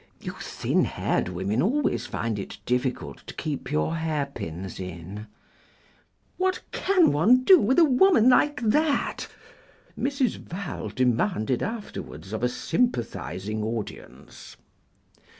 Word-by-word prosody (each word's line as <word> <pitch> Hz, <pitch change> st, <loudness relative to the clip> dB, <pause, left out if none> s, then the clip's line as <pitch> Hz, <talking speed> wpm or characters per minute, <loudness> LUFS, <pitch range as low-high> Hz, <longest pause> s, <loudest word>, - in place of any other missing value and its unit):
You -, -, -6 dB
thin -, -, 0 dB
haired -, -, -1 dB
women 95 Hz, +6 st, -1 dB
always 270 Hz, +9 st, +1 dB
find 115 Hz, -3 st, -2 dB
it 100 Hz, -, -7 dB
difficult 125 Hz, +1 st, -1 dB
to -, -, -8 dB
keep 150 Hz, -3 st, -4 dB
your 155 Hz, +2 st, 0 dB
hairpins 140 Hz, -, -4 dB
in." 90 Hz, +4 st, -7 dB, 1.1 s
"What 375 Hz, 0 st, +1 dB
can 375 Hz, -3 st, +3 dB
one 220 Hz, -, +4 dB
do 370 Hz, +4 st, +8 dB
with 255 Hz, +3 st, +2 dB
a 340 Hz, -, +8 dB
woman 275 Hz, -, +5 dB
like 290 Hz, +3 st, +4 dB
that?" 290 Hz, +6 st, +1 dB, 0.7 s
Mrs. 270 Hz, -3 st, 0 dB
Val 170 Hz, -, -6 dB
demanded 125 Hz, -, +1 dB
afterwards 145 Hz, -, -6 dB
of 110 Hz, -, -3 dB
a 125 Hz, -, +2 dB
sympathising 110 Hz, -, -2 dB
audience. 110 Hz, -, -7 dB
145 Hz, 115 wpm, -26 LUFS, -, 1.1 s, do